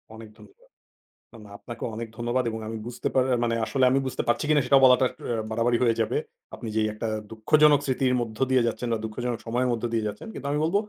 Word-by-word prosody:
অনেক 110 -1 -11
ধন্যবাদ। - - -19 0.6
এবং 115 - -13 0.2
আপনাকেও 120 +2 -7
অনেক 115 +1 -5
ধন্যবাদ 120 +2 0
এবং 110 0 -5
আমি 115 0 -4
বুঝতে 120 - -4
পা - - +4 0.2
মানে 115 -1 +1
আসলে 130 +2 +1
আমি 135 - +3
বুঝতে 130 - -2
পারছি 120 +5 +1
কিনা 150 -2 +4
সেটাও 135 +1 +5
বলাটা 130 0 +6
অ্যা 115 -2 -4
বাড়াবাড়ি 120 +2 +1
হয়ে 115 -2 +2
যাবে। - - 0 0.4
আপনি 120 - -8
যেই 110 -1 +2
একটা 105 +1 -4 0.2
দুঃখজনক 145 +6 +4
স্মৃতির 130 -1 +1
মধ্য 110 -2 -5
দিয়ে 130 -2 +4
যাচ্ছেন 120 +1 -3
বা 115 - -1
দুঃখজনক 120 +2 -3
সময়ের 125 +2 0
মধ্য 120 0 -3
দিয়ে 110 -2 0
যাচ্ছেন। 105 0 -7
কিন্তু 140 - -6
আমি 150 - 0
বলব 165 +5 0
120 Hz, 215 wpm, -26 LUFS, 115-130 Hz, 0.6 s, বলাটা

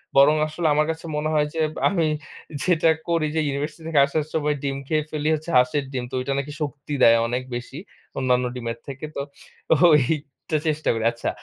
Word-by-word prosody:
বরং 140 +3 +7
আসলে 160 +1 -2
আমার 150 +1 +3
কাছে 160 +1 -8
মনে 155 +1 -1
হয় 150 -1 +3
যে, 165 - -4 0.3
আমি 170 -4 +1 0.6
যেটা 165 -2 +3 0.2
করি 165 -2 +2
যে - - +2
ইউনিভার্সিটি 150 +3 -4
থেকে 155 -3 +2
আসার 145 +2 -1
সময় 150 -1 +1
ডিম 135 -1 -1
খেয়ে 155 -1 +1
ফেলি 150 0 -2
হচ্ছে 155 +2 -7
হাঁসের 125 +3 +3
ডিম। 125 -2 -3
তো - - -4
ঐটা 130 +2 -2
নাকি 140 +2 -5
শক্তি 145 0 -4
দেয় 115 0 +7
অনেক 125 +2 -1
বেশি। 125 +3 -6 0.4
অন্যান্য 125 -1 +2
ডিমের 115 -2 -4
থেকে। 135 +2 -6
তো - - -3 0.5
তো - - +6 0.3
এইটা 150 +2 -2
চেষ্টা 155 0 -1
করি। 115 -1 -3
আচ্ছা। 115 - -3
150 Hz, 195 wpm, -23 LUFS, 130-155 Hz, 0.6 s, বরং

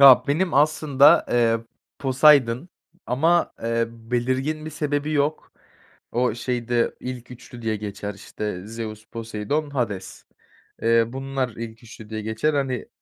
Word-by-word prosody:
Ha, 130 -3 +9
benim 170 +4 +1
aslında, 145 -1 +5
eee, 115 -1 +3 0.4
Poseidon 135 0 +4 0.4
ama, 165 +8 +2
eee, 115 0 +1
belirgin 130 +6 -2
bir 155 - -5
sebebi 150 0 -1
yok. 150 +1 -1 0.6
O 125 -1 +1
şeyde 120 -1 -1
ilk 125 -1 -6
3'lü 120 -1 -11
diye 110 -1 0
geçer, 105 0 -5
işte, 100 -1 -6
Zeus, 110 -1 -6
Poseidon, 115 +7 -3
Hades. 105 -9 -3 0.6
Eee, 115 0 +4
bunlar 135 0 -2
ilk 115 +1 -8
3'lü 110 -2 -12
diye 110 -1 -4
geçer. 110 +8 0
Hani, 130 -4 -1
125 Hz, 130 wpm, -24 LUFS, 115-140 Hz, 0.6 s, Ha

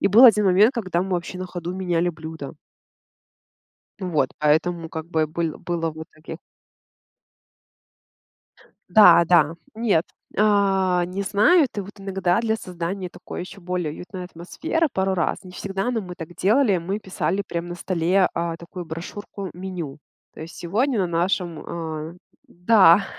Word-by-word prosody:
И - - +3
был 220 +6 +8
1 215 -4 +7
момент, 200 +6 +5
когда 185 -6 -1
мы 195 - -5
вообще 180 +1 -3
на 185 - -4
ходу 175 -1 -5
меняли 175 -2 0
блюдо. 160 -2 -8 1.5
Вот, 160 -8 0
поэтому, 160 +3 +1
как 160 0 -6
бы, 160 -2 0
быль 160 0 -3
было 165 -2 -2
вот 160 0 -9
в - - -22
итоге 160 0 -8 2.6
Да, 175 -6 +9
да, 165 -2 +4 0.2
нет, 215 -7 +1 0.3
э, - - -1 0.7
не 185 +2 -5
знают. 240 - +3
И - - 0
вот 195 +2 -11
иногда 190 -1 0
для 220 -1 0
создания 180 -1 -5
такой - - -8
ещё 185 +2 -9
более 180 -3 -2
уютной 180 +3 -8
атмосферы 190 - -2
пару 190 -6 0
раз, 170 0 -1
не 185 - -11
всегда, 195 +5 -3
но 235 -2 -1
мы 180 -3 -8
так 175 -1 -9
делали, 210 +1 +3
мы 190 +5 -3
писали 195 0 -2
прям 170 0 -4
на 175 - -5
столе, 180 +1 +1
э, 170 -1 -2
такую 175 +1 -8
брошюрку-меню. 180 -1 -7 0.3
То - - -12
есть: 160 +1 -9
"Сегодня 225 +9 0
на 185 - +1
нашем 175 0 -1
а-а" 160 -1 -5 0.3
да, 190 0 +5
180 Hz, 155 wpm, -23 LUFS, 165-195 Hz, 2.6 s, Да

